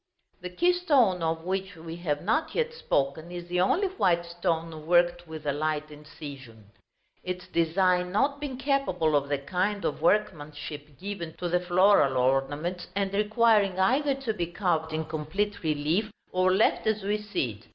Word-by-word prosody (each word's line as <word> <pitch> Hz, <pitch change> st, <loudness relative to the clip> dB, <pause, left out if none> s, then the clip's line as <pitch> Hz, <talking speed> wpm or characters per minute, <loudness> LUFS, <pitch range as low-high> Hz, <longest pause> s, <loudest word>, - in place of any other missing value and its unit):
The 180 Hz, -, -5 dB
keystone, 285 Hz, -, +3 dB
of 160 Hz, 0 st, -1 dB
which 190 Hz, +2 st, -3 dB
we 165 Hz, 0 st, -8 dB
have 150 Hz, -4 st, -2 dB
not 225 Hz, -, 0 dB
yet 475 Hz, 0 st, 0 dB
spoken, 160 Hz, -, -1 dB
is 175 Hz, -1 st, -6 dB
the 180 Hz, +1 st, 0 dB
only 340 Hz, -, +2 dB
white 185 Hz, -, +1 dB
stone 165 Hz, -2 st, -3 dB
worked 175 Hz, 0 st, +3 dB
with 160 Hz, -1 st, -8 dB
the 145 Hz, -2 st, 0 dB
light 155 Hz, +1 st, -2 dB
incision; 140 Hz, -8 st, -11 dB, 0.5 s
its 180 Hz, 0 st, -5 dB
design 180 Hz, +1 st, +1 dB
not 280 Hz, +8 st, +1 dB
being 275 Hz, -3 st, -4 dB
capable 190 Hz, -, +1 dB
of 140 Hz, -1 st, +1 dB
the 145 Hz, -, +1 dB
kind 185 Hz, +8 st, -2 dB
of 150 Hz, -, -2 dB
workmanship 150 Hz, -6 st, -1 dB
given 185 Hz, -4 st, -5 dB
to 180 Hz, -, -3 dB
the 180 Hz, +1 st, +2 dB
floral 180 Hz, -6 st, +4 dB
ornaments, 135 Hz, +7 st, 0 dB
and 200 Hz, -1 st, -1 dB
requiring 210 Hz, -2 st, +3 dB
either 270 Hz, +8 st, +3 dB
to 270 Hz, -5 st, -3 dB
be 175 Hz, -5 st, -2 dB
carved 170 Hz, -3 st, -1 dB
in 155 Hz, 0 st, -2 dB
complete 170 Hz, +8 st, -3 dB
relief, 160 Hz, +7 st, 0 dB, 0.2 s
or 185 Hz, 0 st, +3 dB
left 205 Hz, +3 st, +2 dB
as 215 Hz, -2 st, +1 dB
we 205 Hz, +2 st, 0 dB
see 130 Hz, -, -3 dB
it. -, -, -22 dB
175 Hz, 165 wpm, -27 LUFS, 155-205 Hz, 0.5 s, floral